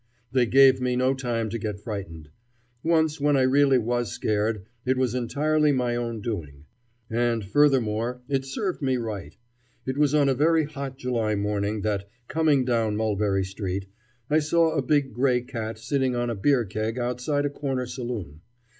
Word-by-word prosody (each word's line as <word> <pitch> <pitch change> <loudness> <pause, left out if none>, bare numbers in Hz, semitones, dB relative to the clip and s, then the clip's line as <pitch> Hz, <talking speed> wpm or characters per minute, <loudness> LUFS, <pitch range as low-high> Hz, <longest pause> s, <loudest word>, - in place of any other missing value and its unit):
They 125 -2 +3
gave 135 +1 +6
me 125 0 0
no 130 +1 +2
time 120 -4 -2
to 115 - -3
get 105 -2 -4
frightened. 95 -8 -7 0.5
Once 160 -1 +2
when 145 -1 +3
I 130 - +3
really 135 +1 +4
was 120 -2 -1
scared, 105 0 -1 0.2
it 130 +1 +1
was 130 -3 +1
entirely 150 +5 +1
my 125 -3 0
own 115 -2 -3
doing. 75 -11 -5 0.5
And, 115 -2 0
furthermore, 125 -1 +2
it 135 -2 0
served 175 +8 -3
me 130 -2 +1
right. 100 -9 -5 0.5
It 130 +2 -3
was 150 0 +3
on 145 -2 +4
a 135 - +3
very 160 +4 +3
hot 140 -3 -6
July 115 -5 -1
morning 105 +1 -1
that, 100 -1 -2 0.2
coming 155 -5 +2
down 115 -4 +1
Mulberry 105 -3 +1
Street, 95 0 -4 0.4
I 150 +2 +3
saw 160 +2 +2
a 145 - 0
big 140 0 +1
gray 125 -1 +2
cat 115 -3 -5
sitting 130 +3 0
on 120 0 -1
a - - -2
beer 125 +3 +2
keg 110 +4 -3
outside 125 +4 -1
a 145 - -1
corner 135 -3 -2
saloon. 120 - -6
125 Hz, 170 wpm, -25 LUFS, 110-135 Hz, 0.5 s, gave